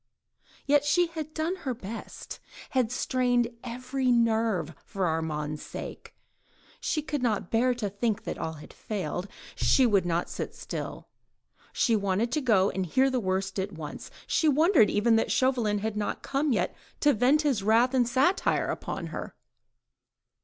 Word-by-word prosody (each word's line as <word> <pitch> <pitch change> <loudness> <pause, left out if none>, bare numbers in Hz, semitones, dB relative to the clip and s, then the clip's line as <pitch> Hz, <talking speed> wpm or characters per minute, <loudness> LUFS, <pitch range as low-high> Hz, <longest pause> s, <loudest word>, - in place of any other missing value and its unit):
Yet 290 0 +4
she 345 +4 +3
had 315 -2 -6
done 320 +4 -2
her 260 -8 -3
best; 225 0 -8 0.3
had 250 -4 +1
strained 245 -1 +1
every 255 +2 -1
nerve 225 -7 +2
for 195 -2 -2
Armand's 155 -2 -2
sake. - - -8 0.6
She 305 - -1
could 295 -2 -3
not 215 -7 -1
bear 245 +2 +3
to 230 -4 -2
think 205 +2 -1
that - - -5
all 160 - -3
had 150 -1 -12
failed. 185 -3 -4 0.3
She 260 -2 +4
could 200 -5 +2
not 170 0 0
sit - - -5
still; - - -6 0.6
she 230 - +2
wanted 200 +3 0
to 305 - 0
go 205 -7 +3
and 190 - -2
hear 265 +10 +3
the 255 - +1
worst 190 -1 -1
at 190 +1 -3
once; 155 -3 -7 0.2
she 315 - +2
wondered 300 - +5
even 225 +2 +3
that 225 - 0
Chauvelin 245 -5 +2
had 215 +1 -2
not 210 -1 -3
come 280 +1 0
yet, 185 -6 0 0.3
to 290 -1 +5
vent 260 +7 +3
his 270 -8 +1
wrath 230 +5 +3
and 250 -2 +3
satire 275 +10 +2
upon - - -4
her. - - -6
230 Hz, 160 wpm, -28 LUFS, 195-265 Hz, 0.6 s, wondered